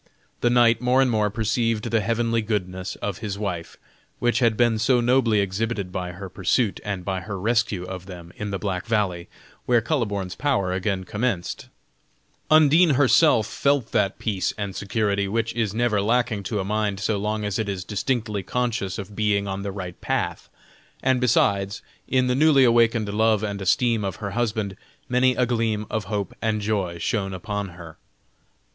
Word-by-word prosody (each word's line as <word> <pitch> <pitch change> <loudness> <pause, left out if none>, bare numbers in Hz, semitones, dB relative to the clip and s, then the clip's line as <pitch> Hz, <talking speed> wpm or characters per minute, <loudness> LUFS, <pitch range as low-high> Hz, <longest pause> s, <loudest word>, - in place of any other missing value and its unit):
The 120 - +2
knight 120 -1 +4
more 125 +1 +3
and 130 -2 +3
more 105 -2 +2
perceived 115 +1 0
the 115 - +3
heavenly 115 +1 0
goodness 95 -4 -3
of 100 -3 -3
his 105 -3 -4
wife, 90 -5 -4 0.4
which 120 0 +1
had 115 -4 +2
been 120 -2 +3
so 125 +3 +3
nobly 120 -3 +3
exhibited 100 0 -2
by 90 -1 -4
her 95 +2 -7
pursuit, 100 +4 0
and 100 -3 -4
by 95 -1 -1
her 100 +1 -5
rescue 110 -3 0
of 90 0 -7
them 90 -2 -10
in 105 - -5
the 100 - -2
Black 95 0 -3
Valley, 100 -6 -1 0.4
where 120 -1 +5
Kuhleborn's 105 - -2
power 120 -11 0
again 95 0 -1
commenced; 105 -3 -3 0.8
Undine 155 +1 +6
herself 130 -2 +4
felt 140 -2 0
that 100 -2 +1
peace 100 -4 -2
and 100 -2 -4
security, 100 -1 0
which 115 +2 -1
is 115 -4 0
never 110 -1 +1
lacking 115 -1 +1
to 105 - -2
a 95 - -2
mind 105 -1 -1
so 105 +1 0
long 105 +1 -2
as 105 +2 -2
it 110 -2 -1
is 95 -2 -3
distinctly 105 +1 -2
conscious 110 -2 -2
of 100 +1 -7
being 100 -1 +1
on 95 0 -3
the 100 0 -4
right 90 -2 -7
path, - - -2 0.5
and 130 -1 +2
besides, 100 -4 +1 0.2
in 130 -1 +2
the 125 - +1
newly 140 0 +5
awakened 115 -3 +3
love 110 0 +2
and 100 -2 -3
esteem 115 +3 +2
of 95 -2 -3
her 100 -2 -5
husband, 110 -4 -1 0.3
many 125 +1 +3
a 125 - +2
gleam 115 -3 -1
of 110 -3 -2
hope 100 -2 -3
and 110 -2 0
joy 100 -5 -1
shone 95 +2 -2
upon 105 0 -4
her. 80 -2 -11
105 Hz, 175 wpm, -24 LUFS, 100-120 Hz, 0.8 s, Undine